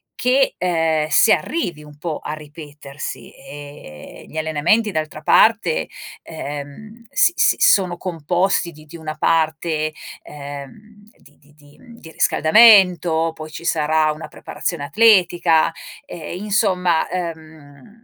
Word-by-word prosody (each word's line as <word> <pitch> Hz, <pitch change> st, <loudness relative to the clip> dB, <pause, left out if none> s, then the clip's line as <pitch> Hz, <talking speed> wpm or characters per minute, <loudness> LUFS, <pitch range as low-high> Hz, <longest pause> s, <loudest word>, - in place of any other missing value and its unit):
che, 260 Hz, +2 st, +1 dB
ehm, 165 Hz, -3 st, 0 dB
si 220 Hz, -, +4 dB
arrivi 175 Hz, -, -1 dB
un 150 Hz, -1 st, -15 dB
po' 155 Hz, -1 st, -4 dB
a -, -, -4 dB
ripetersi. 150 Hz, -2 st, -9 dB
Ehm, 145 Hz, -, -12 dB
gli 160 Hz, -, -9 dB
allenamenti 160 Hz, +8 st, +1 dB
d'altra 155 Hz, -3 st, -4 dB
parte, 200 Hz, 0 st, +3 dB, 0.4 s
ehm, 155 Hz, +10 st, -9 dB
si 355 Hz, -, +3 dB
si -, -, +3 dB
sono 180 Hz, -3 st, +3 dB
composti 175 Hz, +1 st, -1 dB
di 155 Hz, -1 st, -16 dB
di 170 Hz, +3 st, -12 dB
una 155 Hz, -1 st, -6 dB
parte, 160 Hz, -1 st, 0 dB, 0.3 s
ehm, 145 Hz, +10 st, -11 dB
di 145 Hz, -, -23 dB
di 150 Hz, +1 st, -25 dB
di 145 Hz, -1 st, -21 dB, 0.2 s
di 160 Hz, -, -13 dB
riscaldamento, 180 Hz, -4 st, +4 dB
poi 155 Hz, 0 st, -9 dB
ci 170 Hz, -, -9 dB
sarà 155 Hz, -1 st, +1 dB
una 155 Hz, +1 st, -8 dB
preparazione 150 Hz, -1 st, -5 dB
atletica. 175 Hz, -5 st, +3 dB, 0.3 s
Eh, 175 Hz, 0 st, -8 dB
insomma, 185 Hz, -4 st, 0 dB
ehm, 160 Hz, -, -8 dB
160 Hz, 125 wpm, -19 LUFS, 150-180 Hz, 0.4 s, si